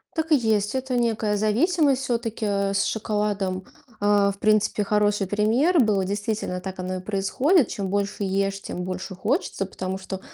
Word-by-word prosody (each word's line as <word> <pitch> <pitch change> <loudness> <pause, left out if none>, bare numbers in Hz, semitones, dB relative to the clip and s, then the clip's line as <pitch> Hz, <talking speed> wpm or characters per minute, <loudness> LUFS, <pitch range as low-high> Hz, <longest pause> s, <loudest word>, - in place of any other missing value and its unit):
Так 320 0 -2
и - - +8
есть. 220 -3 +1
Это 260 -1 -1
некая 220 -3 +1
зависимость 270 - +2
всё-таки. 230 -3 -2
Э, 200 -1 0
с 195 - +2
шоколадом, 205 -3 -1 0.4
а, 205 -1 +4
в 200 - -11
принципе, 215 0 +2
хороший 205 -1 +1
пример 230 - +2
был. 210 -6 +3
Действительно, 200 -1 -2
так 190 0 -7
оно 185 0 -3
и - - -3
происходит: 215 - +2
чем 200 -2 -3
больше 200 +1 -1
ешь, 195 0 -1
тем 180 - -5
больше 185 +1 -5
хочется. 210 - -1
Потому 190 0 -5
что 190 0 -6
205 Hz, 170 wpm, -24 LUFS, 195-225 Hz, 0.4 s, и